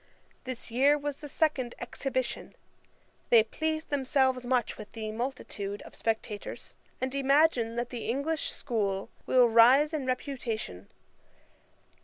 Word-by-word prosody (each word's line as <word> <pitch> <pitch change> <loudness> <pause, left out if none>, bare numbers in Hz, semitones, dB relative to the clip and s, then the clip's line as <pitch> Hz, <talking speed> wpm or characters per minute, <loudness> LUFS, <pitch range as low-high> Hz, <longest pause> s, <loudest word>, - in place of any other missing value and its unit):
This 255 -2 -6
year 275 +5 +4
was 290 -1 -4
the 295 - -9
second 270 -6 0
Exhibition. 255 +1 -3 0.7
They 230 -2 +7
please 315 +7 -2
themselves 265 -3 +1
much 245 -3 +1
with 215 - -10
the 220 -1 -4
multitude 215 -4 -4
of - - -13
spectators, 220 -2 -4 0.3
and 260 0 -2
imagine 275 -4 +3
that 240 +1 -3
the 240 -3 -5
English 285 +6 -1
School 200 -5 -2 0.2
will 250 -1 +6
rise 250 +7 +6
in 285 -4 -2
reputation. 235 - -4
255 Hz, 125 wpm, -29 LUFS, 230-280 Hz, 0.7 s, They